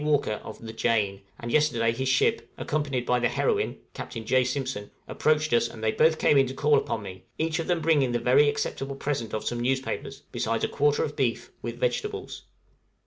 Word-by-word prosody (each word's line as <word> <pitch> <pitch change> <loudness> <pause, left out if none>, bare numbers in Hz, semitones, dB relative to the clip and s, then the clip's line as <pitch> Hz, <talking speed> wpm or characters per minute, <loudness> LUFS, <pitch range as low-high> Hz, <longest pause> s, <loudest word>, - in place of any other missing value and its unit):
Walker, 145 -8 +1
of 110 - -8
the 110 -1 -8
'Jane,' 105 -4 0 0.2
and 120 0 -5
yesterday 120 -6 +3
his 130 +3 -2
ship, 135 +11 +2
accompanied 140 -5 -1
by 125 0 +2
the 120 - +2
'Heroine,' 430 -2 0 0.2
Captain 115 -3 -6
J. 130 +2 +3
Simpson, 130 -5 -3 0.2
approached 155 -2 +1
us, 120 0 +4
and 110 -1 -10
they 110 - +3
both 160 +5 +3
came 145 - +4
in 135 - +3
to 130 - -6
call 150 +1 +3
upon 110 - -3
me, 95 -2 -9
each 160 +1 0
of 165 - -3
them 175 -2 +1
bringing 150 -5 +3
the 120 - +1
very 130 +5 +4
acceptable 135 -1 -3
present 135 -5 -3
of 110 - -3
some 120 - -2
newspapers, 130 +2 -2
besides - - -1
a - - +3
quarter 145 0 +2
of 145 - -3
beef, 125 -5 -1
with - - -5
vegetables. 420 -4 -2
130 Hz, 200 wpm, -27 LUFS, 115-150 Hz, 0.2 s, us